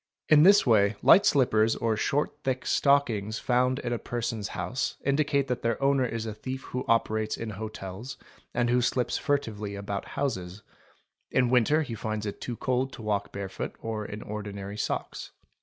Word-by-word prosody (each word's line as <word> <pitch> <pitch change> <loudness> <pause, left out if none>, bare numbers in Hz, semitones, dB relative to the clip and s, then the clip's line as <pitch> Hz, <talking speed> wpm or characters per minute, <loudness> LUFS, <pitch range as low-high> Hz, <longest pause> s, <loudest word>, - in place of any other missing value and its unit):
In 155 -1 +7
this 200 +5 +7
way 105 -4 +4
light 200 +3 +7
slippers 115 -5 +3
or 115 -1 0
short 145 +6 -1
thick 130 -1 -1
stockings 115 -7 +2
found 125 +1 +1
in 120 -3 -3
a 120 - -2
person's 115 -3 -3
house 90 +9 -2
indicate 140 -1 +2
that 125 -1 -2
their 115 -1 0
owner 135 -2 +2
is 115 -1 -4
a 110 - -4
thief 130 +5 -6
who 125 - -4
operates 110 -1 +1
in 115 -1 -5
hotels 105 +2 -7 0.3
and 120 0 +1
who 125 0 +3
slips 125 0 0
furtively 110 -8 -2
about 100 0 -4
houses: 100 -8 -3 0.7
in 125 -2 +2
winter 130 +6 +4
he 125 - -6
finds 110 -1 -3
it 100 - -5
too 120 - -4
cold 130 +1 0
to 115 - -9
walk 100 -1 -1
bare 100 -1 -4
foot 95 - -6
or 110 -1 -4
in 105 +1 -7
ordinary 100 -1 -6
socks. - - -4
115 Hz, 175 wpm, -28 LUFS, 105-130 Hz, 0.7 s, In